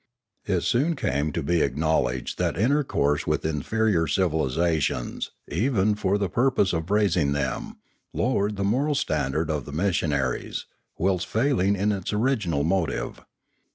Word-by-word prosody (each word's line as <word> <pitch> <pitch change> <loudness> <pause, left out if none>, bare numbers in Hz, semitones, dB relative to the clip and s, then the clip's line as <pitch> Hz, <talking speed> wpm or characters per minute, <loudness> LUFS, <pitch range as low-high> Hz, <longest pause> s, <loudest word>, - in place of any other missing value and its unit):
It 95 -4 +1
soon 150 +8 +1
came 75 - -1
to 85 -3 -2
be 85 +2 +1
acknowledged 65 -3 0
that - - 0
inter 140 +9 +2
course 75 - 0
with - - 0
inferior 80 +4 +1
civilisations, 80 -3 0 0.2
even 105 0 +1
for 100 -1 0
the 100 -1 0
purpose 120 0 +2
of 80 +1 -2
raising 95 -8 +2
them, 65 -4 -3 0.3
lowered 105 -4 0
the 100 - -2
moral 135 +9 +1
standard 75 - 0
of 75 -5 -2
the - - -8
missionaries, 75 -6 -1 0.3
whilst 90 +1 0
failing 110 -5 +2
in 100 +2 +1
its 95 -3 -3
original 105 - +1
motive. 80 -7 -1
90 Hz, 140 wpm, -25 LUFS, 75-105 Hz, 0.3 s, inter